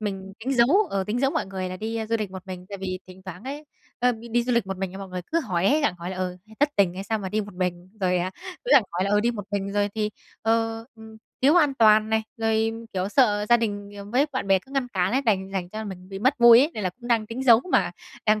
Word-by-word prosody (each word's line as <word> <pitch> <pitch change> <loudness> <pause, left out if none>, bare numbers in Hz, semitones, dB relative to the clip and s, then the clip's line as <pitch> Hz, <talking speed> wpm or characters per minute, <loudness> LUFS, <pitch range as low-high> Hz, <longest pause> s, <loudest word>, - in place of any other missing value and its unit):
mình 195 -2 -5
tính 260 +4 -2
giấu, 285 - +4
ờ, 195 -1 -1
tính 215 +5 -2
giấu 270 0 +2
mọi - - -1
người 190 -1 -4
là 185 - -6
đi 225 +3 -3
du 230 - +2
lịch 210 -3 -3
một 190 -1 -8
mình, 185 -1 -8
tại 200 -1 -7
vì 185 -1 -4
thỉnh 185 0 -13
thoảng 185 +2 -9
ấy, 285 +3 -6 0.3
ơ, 250 0 +3 0.2
đi 240 +1 +2
du 250 +1 -1
lịch 235 -4 +1
một 190 0 -4
mình 190 -1 -3
mọi 195 -1 -7
người 180 0 -5
cứ 335 - +3
hỏi 185 - -1
ấy, 300 +7 +4
gặng 285 - +1
hỏi 170 +1 -5
là, 190 - -5
ừ, 185 -1 -3 0.2
"Thất 290 - +5
tình 190 -3 +3
hay 190 +1 -6
sao 220 +1 -1
mà 195 -2 -4
đi 210 +3 0
một 205 -2 -8
mình?", 180 -1 -3
rồi, 180 -1 +2
à, 180 +1 -1 0.3
cứ - - -3
gặng 265 - +8
hỏi 180 +2 0
là, 200 - -1
ừ, 205 0 +4
"đi 235 +3 +2
một 210 -4 -6
mình 200 -1 -2
rồi 205 0 +1
thì, 215 -1 -1 0.3
ờ, 225 0 0
ừm, 220 -1 -13 0.3
thiếu 285 +4 +6
an 295 -5 +4
toàn 215 -2 +5
này", 220 0 +2
rồi, 225 0 +1 0.2
kiểu, 185 0 -1
sợ 210 -4 +3
gia 240 - +7
đình 205 -3 -3 0.2
với 270 +4 +3
bạn 260 - -2
bè 195 -1 +4
cứ 265 +9 -18
ngăn 270 -3 -1
cản 190 -3 0
ấy, 265 +2 +2
đành 195 -6 0
thành 185 -3 -3
ra 215 - -5
là 220 - -4
mình 185 -3 -8
bị 195 0 -6
mất 260 +7 +3
vui 235 -1 +9
ấy, 290 +4 +2
nên 215 - -4
là 185 - 0
cũng 240 +6 -12
đang 225 -3 +2
tính 230 +4 -5
giấu 235 -3 +7
mà - - +3 0.4
đang 215 0 +4
210 Hz, 290 wpm, -25 LUFS, 190-235 Hz, 0.4 s, vui